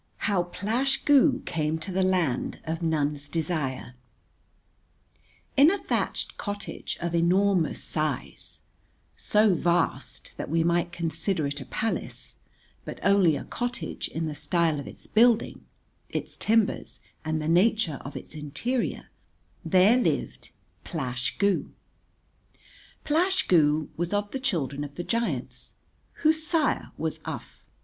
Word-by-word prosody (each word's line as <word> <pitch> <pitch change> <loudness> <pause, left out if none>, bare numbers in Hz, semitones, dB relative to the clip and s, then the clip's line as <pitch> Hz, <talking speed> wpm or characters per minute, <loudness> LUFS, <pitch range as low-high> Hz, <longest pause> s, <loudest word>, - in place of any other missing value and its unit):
How 200 -4 +2
Plash 230 +10 -1
Goo 285 0 +5
Came 155 0 -1
to 160 +4 -5
the 190 +1 +1
Land 180 -9 +1
of 160 +1 -3
None's 150 -3 0
Desire 150 -6 -2 1.6
In 285 +3 +7
a 400 - +1
thatched - - -2
cottage 205 -1 -5
of 170 0 -3
enormous 175 0 +2
size, 155 -4 -3 0.5
so 210 -1 +3
vast 175 0 -1
that - - -5
we 165 +1 +2
might 170 +1 +1
consider 170 0 -1
it 140 0 -3
a - - -7
palace, 225 +10 -3 0.5
but - - -7
only 195 -6 +5
a - - -4
cottage 240 -9 -4
in 165 0 -3
the 155 - -3
style 155 +1 +1
of 140 - -7
its - - -9
building, 235 +1 +3 0.4
its - - -4
timbers 220 -1 +1 0.2
and 155 0 -1
the 155 - -3
nature 180 -2 +3
of 140 - -7
its - - -9
interior, 155 - -2 0.6
there 185 +7 +5
lived - - -1 0.3
Plash 125 -6 -3
Goo. 200 -2 +1 1.3
Plash 360 +5 +2
Goo 155 -3 +3
was 175 +3 -2
of 205 0 -1
the 270 - -3
children 145 - -1
of 145 -1 -8
the 175 - -4
giants, 140 - -3 0.5
whose 315 0 +3
sire 315 -1 0
was - - -3
Uph. - - -7
175 Hz, 130 wpm, -27 LUFS, 155-215 Hz, 1.6 s, In